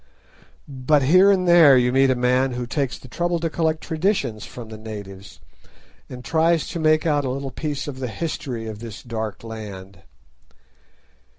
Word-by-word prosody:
But 140 Hz, +1 st, +1 dB
here 185 Hz, +8 st, +6 dB
and 185 Hz, -2 st, +2 dB
there 165 Hz, -6 st, +7 dB
you 125 Hz, 0 st, +2 dB
meet 135 Hz, +1 st, +4 dB
a 130 Hz, -, +3 dB
man 125 Hz, +1 st, +1 dB
who 125 Hz, 0 st, -4 dB
takes 135 Hz, +2 st, -2 dB
the -, -, -14 dB
trouble 175 Hz, +6 st, -1 dB
to 165 Hz, -1 st, -2 dB
collect 160 Hz, -1 st, 0 dB
traditions 155 Hz, -, -1 dB
from 120 Hz, -3 st, -10 dB
the 110 Hz, -, -8 dB
natives, 100 Hz, -2 st, -9 dB, 0.7 s
and 125 Hz, -1 st, -9 dB
tries 165 Hz, 0 st, +2 dB
to 170 Hz, -, -5 dB
make 155 Hz, 0 st, +2 dB
out 145 Hz, -3 st, +1 dB
a 130 Hz, -, -2 dB
little 135 Hz, +1 st, -4 dB
piece 150 Hz, -2 st, -4 dB
of 135 Hz, -3 st, -6 dB
the 130 Hz, -, -3 dB
history 130 Hz, -3 st, -4 dB
of 110 Hz, -1 st, -7 dB
this 115 Hz, -2 st, -9 dB
dark 110 Hz, -4 st, -5 dB
land. 100 Hz, -4 st, -9 dB
130 Hz, 175 wpm, -22 LUFS, 115-155 Hz, 0.7 s, there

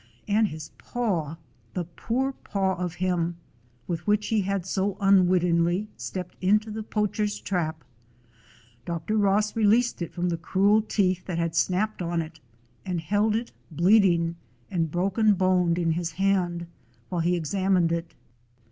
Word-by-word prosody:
And 215 Hz, +1 st, +3 dB
his 155 Hz, -3 st, -8 dB
paw 175 Hz, -11 st, -2 dB, 0.2 s
— 115 Hz, -2 st, -35 dB
the 180 Hz, -, -1 dB
poor 235 Hz, +10 st, -2 dB
paw 195 Hz, -7 st, -1 dB
of 180 Hz, -1 st, -4 dB
him, 175 Hz, -2 st, -1 dB, 0.5 s
with 170 Hz, 0 st, -4 dB
which 210 Hz, 0 st, +2 dB
he 220 Hz, -2 st, +2 dB
had 195 Hz, -2 st, -2 dB
so 195 Hz, +1 st, -1 dB
unwittingly 180 Hz, -1 st, +3 dB
stepped 180 Hz, -2 st, -6 dB
into 210 Hz, +3 st, +2 dB
the 220 Hz, +1 st, -4 dB
poach 210 Hz, 0 st, -2 dB
er's 210 Hz, -1 st, 0 dB
trap 160 Hz, -5 st, -2 dB, 0.5 s
— 115 Hz, +1 st, -29 dB
Dr. 170 Hz, +5 st, -2 dB
Ross 210 Hz, 0 st, +2 dB
released 225 Hz, 0 st, +3 dB
it 170 Hz, -, -3 dB
from 180 Hz, 0 st, -1 dB
the 170 Hz, -, -1 dB
cruel 200 Hz, +6 st, +3 dB
teeth 185 Hz, -4 st, 0 dB
that 175 Hz, -3 st, -3 dB
had 170 Hz, -1 st, -1 dB
snapped 195 Hz, +4 st, +1 dB
on 170 Hz, -1 st, -1 dB
it, 160 Hz, 0 st, -6 dB, 0.4 s
and 180 Hz, +1 st, -2 dB
held 205 Hz, +6 st, +1 dB
it, 235 Hz, +2 st, -3 dB, 0.2 s
bleed 185 Hz, +6 st, +4 dB
ing 170 Hz, -2 st, +1 dB, 0.3 s
and 165 Hz, -4 st, 0 dB
broken 195 Hz, +5 st, +2 dB
boned, 180 Hz, -2 st, +2 dB
in 170 Hz, -2 st, +1 dB
his 165 Hz, 0 st, -2 dB
hand 180 Hz, -2 st, 0 dB, 0.4 s
while 175 Hz, -2 st, -1 dB
he 175 Hz, +2 st, +2 dB
examined 180 Hz, +1 st, +1 dB
it. 170 Hz, 0 st, -3 dB
185 Hz, 160 wpm, -26 LUFS, 170-205 Hz, 0.5 s, bleed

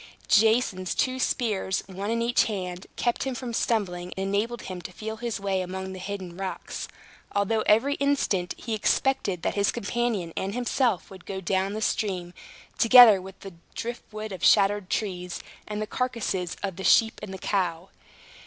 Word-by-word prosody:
Jason's 215 Hz, -4 st, +3 dB
two 260 Hz, -1 st, 0 dB
spears, 210 Hz, -7 st, 0 dB
one 195 Hz, +2 st, -5 dB
in 230 Hz, 0 st, 0 dB
each 240 Hz, +1 st, +3 dB
hand, 185 Hz, -4 st, -4 dB
kept 240 Hz, -1 st, 0 dB
him 265 Hz, -2 st, -2 dB
from 245 Hz, -1 st, -5 dB
stumbling, 180 Hz, -7 st, -1 dB
and 195 Hz, +1 st, -2 dB
enabled 230 Hz, +3 st, -1 dB
him 185 Hz, -1 st, -6 dB
to 180 Hz, -, -8 dB
feel 220 Hz, +4 st, -6 dB
his 235 Hz, -1 st, -3 dB
way 195 Hz, -1 st, 0 dB
among 190 Hz, +1 st, -5 dB
the 185 Hz, -, -7 dB
hidden 185 Hz, -2 st, -6 dB
rocks; 190 Hz, 0 st, -5 dB, 0.5 s
although 205 Hz, +2 st, +2 dB
every 230 Hz, +7 st, +4 dB
instant, 275 Hz, -11 st, +1 dB
he 230 Hz, -, -4 dB
expected 215 Hz, -4 st, +1 dB
that -, -, 0 dB
his 200 Hz, -1 st, +2 dB
companion 205 Hz, -6 st, -2 dB
and 195 Hz, +3 st, -2 dB
himself 245 Hz, -5 st, 0 dB
would 190 Hz, -2 st, -12 dB
go 195 Hz, -1 st, -4 dB
down 190 Hz, +2 st, 0 dB
the 215 Hz, -, -4 dB
stream, 180 Hz, -6 st, -1 dB, 0.5 s
together 230 Hz, -4 st, +9 dB
with 190 Hz, +1 st, -11 dB
the 195 Hz, -2 st, -9 dB, 0.2 s
driftwood 220 Hz, -2 st, -6 dB
of 185 Hz, -2 st, -7 dB
shattered 200 Hz, -1 st, +4 dB
trees, 180 Hz, -4 st, -2 dB, 0.3 s
and 210 Hz, 0 st, -4 dB
the -, -, -3 dB
carcasses 215 Hz, -7 st, -2 dB
of 190 Hz, -3 st, -3 dB
the 190 Hz, -, -5 dB
sheep 225 Hz, +2 st, +4 dB
and 190 Hz, -2 st, -7 dB
cow. 180 Hz, -3 st, -1 dB
200 Hz, 170 wpm, -26 LUFS, 185-230 Hz, 0.5 s, together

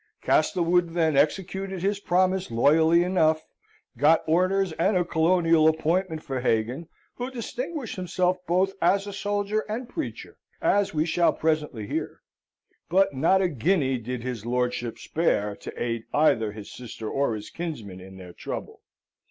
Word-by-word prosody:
Castlewood 175 Hz, -1 st, +2 dB
then 160 Hz, -3 st, +2 dB
executed 190 Hz, +5 st, 0 dB
his 200 Hz, +1 st, 0 dB
promise 185 Hz, 0 st, +1 dB
loyally 160 Hz, +8 st, +4 dB
enough, 160 Hz, -4 st, +2 dB, 0.6 s
got 155 Hz, +3 st, +4 dB
orders 185 Hz, +3 st, +2 dB
and 190 Hz, +3 st, +3 dB
a 175 Hz, -, +1 dB
colonial 165 Hz, -1 st, +3 dB
appointment 160 Hz, +1 st, 0 dB
for 135 Hz, -1 st, -3 dB
Hagan, 125 Hz, +7 st, -1 dB, 0.3 s
who 245 Hz, +1 st, -3 dB
distinguished 255 Hz, +1 st, -5 dB
himself 180 Hz, 0 st, 0 dB
both 185 Hz, +3 st, +2 dB
as 195 Hz, +3 st, +3 dB
soldier 205 Hz, +1 st, -1 dB
and 235 Hz, +3 st, -4 dB
preacher, 310 Hz, +5 st, -6 dB, 0.2 s
as 205 Hz, 0 st, +2 dB
we 155 Hz, 0 st, 0 dB
shall 170 Hz, +1 st, +2 dB
presently 150 Hz, -8 st, -1 dB
hear; -, -, -4 dB, 0.7 s
but 190 Hz, -2 st, +3 dB
not 170 Hz, +8 st, +3 dB
a -, -, +3 dB
guinea 145 Hz, -, +1 dB
did 120 Hz, +1 st, -5 dB
his 125 Hz, -4 st, -4 dB
lordship 125 Hz, 0 st, -2 dB
spare 105 Hz, -11 st, 0 dB
to -, -, -8 dB
aid 115 Hz, -1 st, -2 dB
either 115 Hz, -8 st, +3 dB
his 105 Hz, -1 st, -10 dB
sister 115 Hz, -3 st, -8 dB
or 135 Hz, -1 st, 0 dB
his 105 Hz, -1 st, -8 dB
kinsman 120 Hz, -, -6 dB
in 95 Hz, +1 st, -12 dB
their 90 Hz, -2 st, -11 dB
trouble. -, -, -7 dB
165 Hz, 145 wpm, -26 LUFS, 125-185 Hz, 0.7 s, loyally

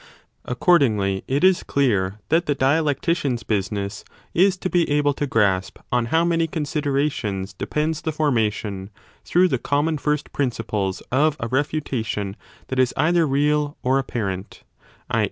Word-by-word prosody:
Accordingly 115 Hz, -, +2 dB
it 140 Hz, +5 st, 0 dB
is 185 Hz, -1 st, +5 dB
clear 105 Hz, -8 st, 0 dB
that 165 Hz, +1 st, +2 dB
the 145 Hz, -, +1 dB
dialectician 145 Hz, +1 st, +1 dB
s 120 Hz, -, -5 dB
business 100 Hz, 0 st, -2 dB, 0.3 s
is 185 Hz, +2 st, +4 dB
to 185 Hz, -, -3 dB
be 175 Hz, -2 st, +1 dB
able 145 Hz, 0 st, +2 dB
to 145 Hz, +1 st, -2 dB
grasp 100 Hz, -6 st, +1 dB
on 120 Hz, -1 st, +2 dB
how 165 Hz, +6 st, +2 dB
many 165 Hz, -1 st, +1 dB
considerations 140 Hz, -, -2 dB
depends 150 Hz, -, -2 dB
the 160 Hz, -, -2 dB
formation, 110 Hz, -9 st, -1 dB, 0.3 s
through 180 Hz, +2 st, +3 dB
the 130 Hz, -8 st, -1 dB
common 145 Hz, +4 st, 0 dB
first 150 Hz, 0 st, -1 dB
principles, 110 Hz, -7 st, -2 dB
of 145 Hz, +3 st, +2 dB
a 115 Hz, -, -2 dB
refutation 125 Hz, -7 st, -2 dB, 0.3 s
that 130 Hz, -, -3 dB
10 -, -, +5 dB
is 125 Hz, -, +1 dB
either 165 Hz, +1 st, +3 dB
real 145 Hz, +1 st, +1 dB
or 130 Hz, +2 st, +3 dB
apparent, 100 Hz, -8 st, -4 dB, 0.5 s
i. -, -, +2 dB
140 Hz, 150 wpm, -22 LUFS, 110-155 Hz, 0.5 s, is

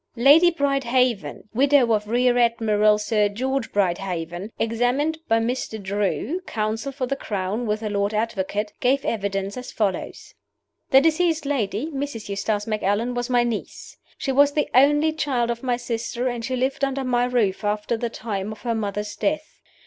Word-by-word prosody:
Lady 290 Hz, +8 st, +6 dB
Brydehaven, 260 Hz, -, 0 dB
widow 265 Hz, -1 st, +4 dB
of 210 Hz, -1 st, 0 dB
Rear 245 Hz, +2 st, +2 dB
Admiral 215 Hz, -3 st, +3 dB
Sir 210 Hz, 0 st, +1 dB
George 260 Hz, +4 st, -2 dB
Brydehaven, 180 Hz, 0 st, -2 dB
examined 245 Hz, +8 st, 0 dB
by 225 Hz, -, +3 dB
Mr. 225 Hz, -1 st, -2 dB
Drew 205 Hz, -, -2 dB
(counsel 220 Hz, +5 st, -2 dB
for 270 Hz, -1 st, -3 dB
the 275 Hz, -, -2 dB
Crown 210 Hz, 0 st, -3 dB
with 210 Hz, +1 st, -1 dB
the 215 Hz, -, -3 dB
Lord 200 Hz, 0 st, 0 dB
Advocate), 210 Hz, -1 st, -2 dB
gave 270 Hz, +2 st, +1 dB
evidence 200 Hz, -1 st, -2 dB
as 250 Hz, 0 st, -7 dB
follows: 205 Hz, -4 st, -3 dB, 0.6 s
"The 270 Hz, -2 st, +7 dB
deceased 325 Hz, 0 st, +2 dB
lady 255 Hz, -4 st, -1 dB
(Mrs. 270 Hz, -7 st, -5 dB
Eustace 205 Hz, +1 st, -1 dB
Macallan) 215 Hz, +2 st, 0 dB
was 245 Hz, +1 st, -3 dB
my 245 Hz, -1 st, +3 dB
niece. 235 Hz, -3 st, -5 dB, 0.2 s
She 290 Hz, -4 st, -2 dB
was 285 Hz, +2 st, +4 dB
the 295 Hz, -, +1 dB
only 295 Hz, +4 st, +4 dB
child 255 Hz, -6 st, 0 dB
of 235 Hz, 0 st, -5 dB
my 250 Hz, -2 st, 0 dB
sister, 240 Hz, +1 st, -3 dB
and 240 Hz, -2 st, -3 dB
she 255 Hz, +2 st, -2 dB
lived 260 Hz, +2 st, -1 dB
under 275 Hz, 0 st, 0 dB
my 245 Hz, -1 st, +1 dB
roof 225 Hz, -6 st, 0 dB
after 210 Hz, +2 st, -1 dB
the 235 Hz, +1 st, -2 dB
time 215 Hz, -3 st, -4 dB
of 215 Hz, -, -10 dB
her 235 Hz, -2 st, 0 dB
mother's 210 Hz, -1 st, -3 dB
death. 310 Hz, +1 st, -2 dB
235 Hz, 165 wpm, -23 LUFS, 210-265 Hz, 0.6 s, The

